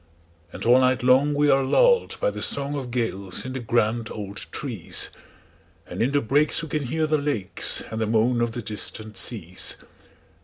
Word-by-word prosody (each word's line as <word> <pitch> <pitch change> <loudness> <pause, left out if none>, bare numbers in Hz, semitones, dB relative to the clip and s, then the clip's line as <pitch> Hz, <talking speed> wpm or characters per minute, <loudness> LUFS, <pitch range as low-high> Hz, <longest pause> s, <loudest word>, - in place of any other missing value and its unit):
And - - -7
all 120 +2 +6
night 130 -1 +2
long 135 +4 +4
we 145 +1 +3
are 135 - +4
lulled 480 - +3
by - - +1
the - - -7
songOf 140 -2 -1
gales 115 -6 -2
in 130 - -5
the 130 - -3
grand 115 -1 0
old 100 -2 -6
trees; - - -3 0.7
And - - -6
in 125 +4 +2
the 145 0 +2
breaks 145 +8 +2
we 160 - -6
can 150 -1 -2
hear 160 +5 0
the 155 0 +1
lakesAnd 110 -4 -1
the 110 - 0
moan 115 +2 +2
of 120 -1 0
the 120 - -5
distant 110 +1 -4
seas. 90 -5 -1
125 Hz, 180 wpm, -24 LUFS, 110-145 Hz, 0.7 s, all